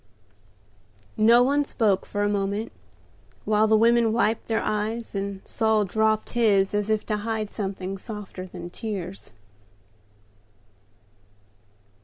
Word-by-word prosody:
No 230 +3 +6
one 285 +3 +2
spoke 215 -8 0
for 205 0 -2
a - - +2
moment, 205 +2 -1 0.7
while 215 0 +3
the 220 0 +4
women 230 0 +4
wiped 225 -1 0
their 225 - 0
eyes, 220 +2 -2
and 195 -1 -5
Saul 220 -2 +1
dropped 220 +2 0
his 205 -5 +2
as 205 0 0
if 215 -1 0
to 210 - -1
hide 215 0 -3
something 195 -2 -4
softer 205 -4 -8
than 175 -1 -9
tears. 195 - -6
215 Hz, 120 wpm, -25 LUFS, 200-225 Hz, 0.7 s, No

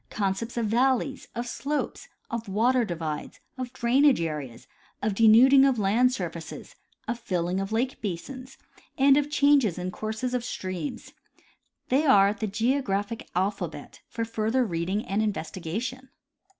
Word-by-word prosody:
concepts 205 +4 -2
of 235 - +1
valleys, 260 +4 +1
of 235 +1 -3
slopes, 285 +4 -3 0.2
of 230 -2 -4
water 240 +5 +2
divides, 160 -6 -5 0.2
of 255 -2 -5
drainage 260 - +3
areas, 150 -8 -4 0.3
of 210 0 -1
denuding 230 +6 +7
of 270 -3 +3
land 220 +5 +3
surfaces, 260 - -6 0.3
of 235 0 -2
filling 180 -3 -1
of 195 +1 -4
lake 245 +4 -1
basins, 255 +7 -6 0.4
and 275 0 +6
of 295 0 +1
changes 285 - +3
in 180 0 -3
courses 220 +5 -4
of 250 -1 -1
streams. 185 -9 -5 0.8
They 270 +4 +3
are 200 -8 +5
the 215 +1 -4
geographic 225 -1 -1
alpha 190 0 0
bet 150 -2 -12
for 230 -1 -3
further 225 +3 0
reading 185 +3 -2
and 200 +2 0
investigation. 215 +6 -4
225 Hz, 140 wpm, -26 LUFS, 195-255 Hz, 0.8 s, denuding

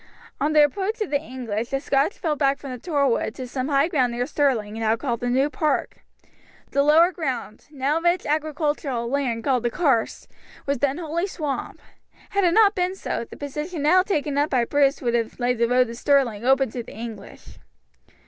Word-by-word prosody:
On 300 +2 +1
the 300 -1 +7
approach 395 +9 -1
of 420 - -2
the 285 -1 +1
English 240 -6 -4
the 270 0 -1
Scotch 280 +6 0
fell 315 -4 -1
back 275 -1 +1
from 275 - -8
the 250 - -6
Torwood 280 -7 0
to 255 - -6
some 255 +1 -3
high 280 +1 +3
ground 255 -8 +1
near 245 +1 -1
Stirling 255 -8 0
now 225 0 +1
called 235 -1 -3
the 245 - -2
New 265 +3 +2
Park. 300 -1 -1 0.7
The 280 - +2
lower 320 +5 +5
ground, 265 - -5
now 290 +2 -1
rich 345 +1 +1
agricultural 295 -5 -1
land 245 -3 -1
called 255 -2 +1
the 240 - 0
Carse, 265 -5 0 0.4
was 280 -2 -1
then 280 +1 +1
wholly 340 +2 -2
swamp. 300 -7 -4 0.5
Had 400 -1 +1
it 345 - +3
not 425 -2 +6
been 365 -1 -1
so, 310 - -4
the - - -11
position 300 +3 -5
now 360 +5 +5
taken 300 -7 -1
up 295 +2 +1
by 250 -3 +2
Bruce 285 +2 +2
would 240 -1 0
have 230 0 -1
laid 245 -1 0
the 235 - +3
road 250 +1 +3
to 230 - -8
Stirling 240 -4 +1
open 265 -1 +3
to 245 - -4
the 230 - -12
English. 220 -3 -9
280 Hz, 200 wpm, -23 LUFS, 245-310 Hz, 0.7 s, the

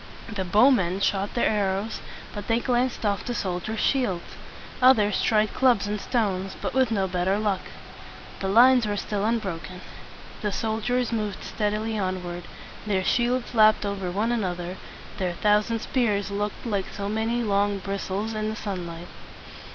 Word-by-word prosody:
The 195 -2 -2
bowmen 195 -2 +4
shot 200 0 0
their 240 - +3
arrows, 200 0 0 0.3
but 205 - -6
they 230 -1 +2
glanced 245 -1 0
off 200 -1 +1
from - - -10
the 245 - -2
soldiers' 195 +3 -3
shields. 225 -11 0 0.5
Others 215 -6 +5
tried 215 -1 +2
clubs 245 -6 +3
and 205 0 -3
stones, 195 -5 -1
but - - -3
with 260 -2 +3
no 195 -4 +1
better 185 +2 0
luck. 205 -3 0 0.8
The 195 - -2
lines 240 +3 +6
were 205 -1 -1
still 205 0 -2
un 230 +2 +2
bro 190 -7 -4
ken. 180 +1 -10 0.6
The 210 - -1
soldiers 225 +4 -1
moved 215 -3 -2
stead 210 -1 -1
i - - 0
ly 220 0 -2
onward; 180 -2 -3 0.4
their 190 -2 +1
shields 245 +4 +1
lapped 215 -2 +5
over 200 -2 -2
one 210 +6 0
another; 180 -5 -2 0.4
their 180 -2 -1
thousand 210 +4 +2
spears 210 -6 0
looked 205 +3 -3
like 200 -5 -1
so 200 -1 -4
many 225 +3 0
long 205 -1 +1
bris 195 0 -4
tles 205 +4 -2
in 215 0 -2
the 220 - -3
sun 190 -5 -4
light. 170 +1 -8
210 Hz, 175 wpm, -25 LUFS, 190-225 Hz, 0.8 s, lines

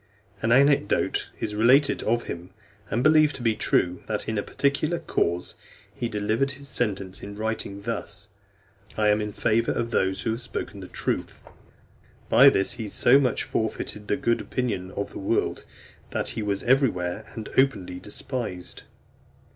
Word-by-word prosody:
An 110 - +1
anecdote 140 -3 +3
is 105 - -3
related 125 +7 +4
of 120 +2 +1
him, 85 +1 -7 0.4
and 120 +3 0
believed 155 0 +5
to 125 - -7
be 115 -2 +3
true, 90 -4 +1
that, 105 -1 -3
in 110 - -1
a 100 - +1
particular 145 +8 0
cause, 85 - -1 0.4
he 120 - -3
delivered 110 +5 0
his 140 0 -10
sentence 100 -7 -2
in 100 0 -8
writing 110 -2 -3
thus: 105 -2 -5 0.7
"I 105 -1 +3
am 105 +1 +3
in 105 0 -3
favour 115 +2 +1
of 115 0 -2
those 95 -2 +1
who 115 - -1
have 115 +3 -3
spoken - - -5
the - - -8
truth." - - -3 0.9
By - - +8
this 95 - +1
he 110 -3 -5
so 125 +6 +5
much 130 -3 +1
forfeited 105 -1 -3
the - - +1
good 115 -4 +1
opinion 115 -8 -2
of 100 +1 -4
the - - -7
world, 100 +4 -1 0.4
that - - -2
he - - -4
was 100 -1 -2
everywhere 110 -7 +1
and 110 -1 -6
openly 95 -10 +1
despised. 105 -4 -4
110 Hz, 165 wpm, -25 LUFS, 100-125 Hz, 0.9 s, By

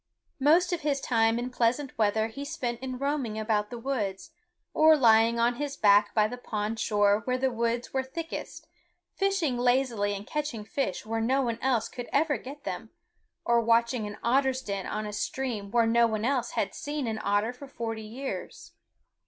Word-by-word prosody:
Most 335 +6 +4
of 345 - -2
his 290 -2 0
time 225 -3 +2
in 245 +1 -3
pleasant 250 +3 0
weather 220 0 +2
he 275 +5 -7
spent 255 -6 -3
in 255 -1 -5
roaming 275 -5 -2
about 215 -1 0
the 240 - -6
woods, 225 -7 -3 0.4
or 315 0 +6
lying 230 -2 +5
on 240 +1 +2
his 285 -1 -4
back 205 0 +4
by 215 -1 +4
the 245 +3 -7
pond 215 -1 -3
shore 205 -1 +3
where 255 0 0
the 260 0 +1
woods 235 0 -2
were 265 - +1
thickest, 325 +5 -6 0.5
fishing 380 -11 0
lazily 245 -5 +1
and 200 +1 -7
catching 290 -8 -4
fish 220 -5 -2
where 225 +1 -2
no 265 +4 +2
one 235 -2 -2
else 250 -4 +1
could 245 -2 -8
ever 295 0 +2
get 285 +3 -10
them, - - -5 0.6
or 235 0 +4
watching 230 0 +2
an 205 - -8
otter's 265 +2 +2
den 200 -4 -4
on 215 0 -3
a 210 - -5
stream 220 -3 -3
where 235 +2 +3
no 235 +1 +4
one 220 -1 -2
else 250 -2 0
had 195 - -1
seen 290 -1 -4
an 220 -1 -2
otter 205 +4 +1
for 275 +3 -11
forty 225 -4 -5
years. 240 +6 -7
235 Hz, 185 wpm, -28 LUFS, 220-270 Hz, 0.6 s, or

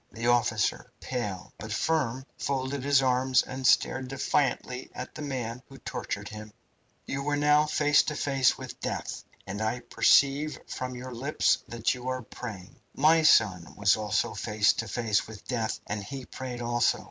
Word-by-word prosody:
The 115 0 -5
officer, 120 -3 +1
pale, 105 -8 -4
but 110 0 -7
firm, 135 -1 0
folded 135 0 -2
his 140 -1 +4
arms 130 0 +3
and 130 0 -2
stared 130 0 +3
defiantly 130 -1 -1
at - - -6
the - - -8
man 125 -4 -4
who - - -12
tortured - - -5
him. 105 0 -9 0.5
"You 140 +1 -3
are 145 - +2
now 150 +1 +4
face 150 -1 +4
to 150 - -2
face 135 -3 +2
with - - -8
death, - - -4 0.2
and 100 +2 -5
I 110 +3 -1
perceive 140 +4 +3
from 125 0 -5
your 125 +1 -7
lips 135 +6 +1
that 115 -1 0
you 125 0 -8
are 130 -1 -2
praying. 105 -5 -9 0.2
My 160 +3 +5
son 95 - +4
was 100 -1 +4
also 105 -2 0
face 105 0 +2
to 115 - -4
face 110 -1 0
with 110 -2 -11
death, 115 -4 -1
and 100 0 -4
he 135 +4 -7
prayed, 125 -2 -6
also. 120 0 +2
125 Hz, 170 wpm, -28 LUFS, 110-135 Hz, 0.5 s, My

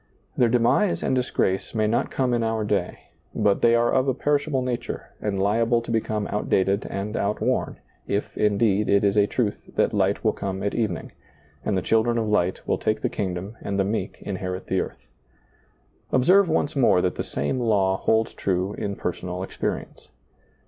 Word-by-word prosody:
Their 120 - +3
demise 125 - +2
and - - +1
disgrace 120 -6 0
may 110 -1 +2
not 110 +3 +1
come 130 -2 0
in 120 - +1
our 110 -1 0
day, 105 - -2 0.2
but 100 -1 +2
they 120 0 +5
are 120 0 +2
of 130 +1 +2
a 130 - +1
perishable 145 -1 0
nature 125 -2 -4
and 100 -2 -1
liable 115 +4 +2
to 115 0 -6
become 110 -2 -1
out 105 - -2
dated 95 +2 +2
and 100 +2 -4
outworn, 100 +1 -1 0.3
if, 100 - -2
indeed, 105 0 +2
it 100 0 +4
is 100 0 +2
a 105 -1 +4
truth 110 -3 -2
that - - +2
light 100 -1 +1
will 110 -2 +2
come 95 -1 -4
at 100 - -1
evening, 105 -9 -2 0.5
and 100 - 0
the 90 - -1
children 115 +1 +2
of 110 -1 0
light 95 -3 0
will - - +1
take 110 0 0
the - - +1
kingdom 95 +2 -4
and 100 -1 -3
the 100 - +3
meek 100 -2 -3
inherit 95 -1 -4
the 95 - 0
earth. - - -8 1.1
Observe 180 +9 +5
once 150 -2 0
more 125 -9 +4
that 90 0 +1
the - - -4
same 70 - -2
law 100 -5 +2
holds 110 +2 +1
true 95 +1 -1
in 100 -1 -3
personal 90 0 -4
experience. - - -5
105 Hz, 185 wpm, -24 LUFS, 95-120 Hz, 1.1 s, they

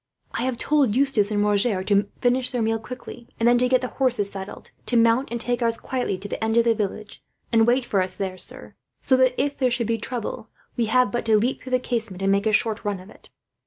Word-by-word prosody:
"I - - -3
have 255 -2 -1
told 280 -7 +2
Eustace 255 -7 +2
and 205 -1 +1
Roger 205 -1 +1
to 200 +1 +2
finish 250 +1 +2
their 245 -3 -1
meal 225 0 0
quickly, 240 0 -9
and 230 - +3
then 240 0 +5
to 250 0 +2
get 255 -1 +3
the 255 - -3
horses 245 -7 0
saddled; 195 0 -9 0.2
to 245 - +2
mount, 230 +3 +3
and 235 - -3
take 245 +1 -1
ours 230 -1 +1
quietly 250 -7 -2
to 195 +2 -6
the 205 - -4
end 220 +1 +1
of 235 - +6
the 230 -1 +3
village, 210 -1 -5 0.3
and 225 -1 +4
wait 250 +1 +2
for 195 -5 +1
us 185 0 -3
there, 190 -2 -4
sir; - - -6 0.3
so 260 - +4
that 255 -1 +2
if 285 -1 -1
there 255 -2 +3
should 235 -1 -1
be 230 +1 -1
trouble, 230 -1 -5 0.3
we 235 - +1
have 250 0 +2
but 240 - -2
to 220 -1 +4
leap 240 +5 0
through 260 - -9
the - - +5
casement, 225 -7 -4
and 195 - +3
make 200 +2 +2
a - - +3
short 220 0 +2
run 205 -3 -2
of 185 +3 -13
it." - - -18
230 Hz, 255 wpm, -24 LUFS, 205-250 Hz, 0.3 s, of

